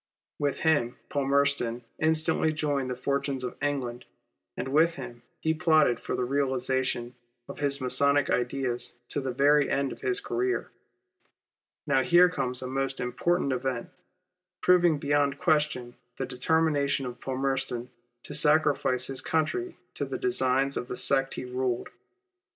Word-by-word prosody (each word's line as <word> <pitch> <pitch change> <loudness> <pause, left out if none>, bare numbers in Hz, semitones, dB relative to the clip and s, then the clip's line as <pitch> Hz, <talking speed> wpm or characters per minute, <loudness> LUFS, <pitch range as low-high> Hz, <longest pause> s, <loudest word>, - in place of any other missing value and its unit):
With 145 -1 -1
him 145 -6 +2
Palmerston 140 -4 +1 0.2
instantly 160 0 +1
joined 145 -4 -1
the 125 - -2
fortunes 140 +1 -2
of 125 - -4
England, 135 -4 -2 0.5
and - - -3
with 160 +4 +3
him 120 -3 -8 0.2
he 160 - +1
plotted 155 -7 +3
for - - -3
the 125 - -1
realization 130 -2 -1 0.3
of - - -9
his 140 -1 +2
Masonic 140 +2 +2
ideas 125 -1 -1 0.2
to 145 - -2
the 130 - -3
very 145 +3 +3
end 140 -1 0
of - - -9
his 390 0 +3
career. 380 -1 -2 1.1
Now 140 -3 +3
here 175 +5 +5
comes 125 -7 -2
a - - -4
most 135 +1 -2
important 140 +5 0
event, 130 -1 -3 0.7
proving 175 -3 +5
beyond 145 -1 +1
question 145 -6 0 0.2
the 135 - -2
determination 140 +1 +1
of 125 -1 -7
Palmerston 130 -2 -2 0.3
to - - -9
sacrifice 145 -4 +3
his 135 -1 0
country 165 - -1 0.2
to - - -3
the - - -4
designs 135 - +1
of 120 - -4
the 125 - -5
sect 135 +1 +1
he - - -5
ruled. 125 -1 -2
140 Hz, 145 wpm, -28 LUFS, 125-150 Hz, 1.1 s, here